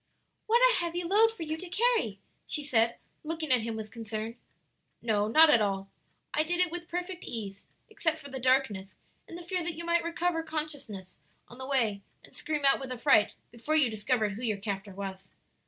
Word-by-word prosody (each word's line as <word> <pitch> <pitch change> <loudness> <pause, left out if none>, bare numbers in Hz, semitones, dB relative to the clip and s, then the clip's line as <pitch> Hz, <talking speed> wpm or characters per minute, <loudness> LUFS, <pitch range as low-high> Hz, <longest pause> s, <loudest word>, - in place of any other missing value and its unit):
"What 470 +2 +4
a - - +2
heavy 345 0 -2
load 410 +6 +5
for 450 -7 -7
you 315 0 -3
to 360 +2 -7
carry!" 425 - +1 0.3
she 300 - -2
said, 235 -4 +2 0.3
looking 315 -2 -3
at 250 -2 +5
him 225 0 -3
with 215 -1 -6
concern. 225 0 -5 0.6
"No, 210 -3 +1
not 310 +7 +7
at 235 - +5
all; 195 -1 -1 0.4
I 305 - +3
did 350 +2 -2
it 360 -2 +3
with 345 0 -6
perfect 360 +1 -4
ease, 200 -4 -5 0.2
except 325 -7 0
for 280 -2 -11
the 265 - -4
darkness 250 -7 +1 0.3
and 335 - -8
the 350 - -9
fear 360 +1 -2
that 335 -1 -3
you 335 +1 -6
might 340 0 +2
recover 340 0 0
consciousness 290 - -5 0.3
on 245 - -13
the 260 - -6
way 230 -8 +1 0.2
and - - -13
scream 300 -2 -2
out 275 - +5
with 265 -1 -6
affright 225 -3 +3 0.2
before 240 +7 -2
you 280 -7 +4
discovered 215 0 0
who 205 +4 -7
your 220 -4 0
captor 195 -1 -5
was." 190 -1 -6
265 Hz, 200 wpm, -30 LUFS, 215-335 Hz, 0.6 s, not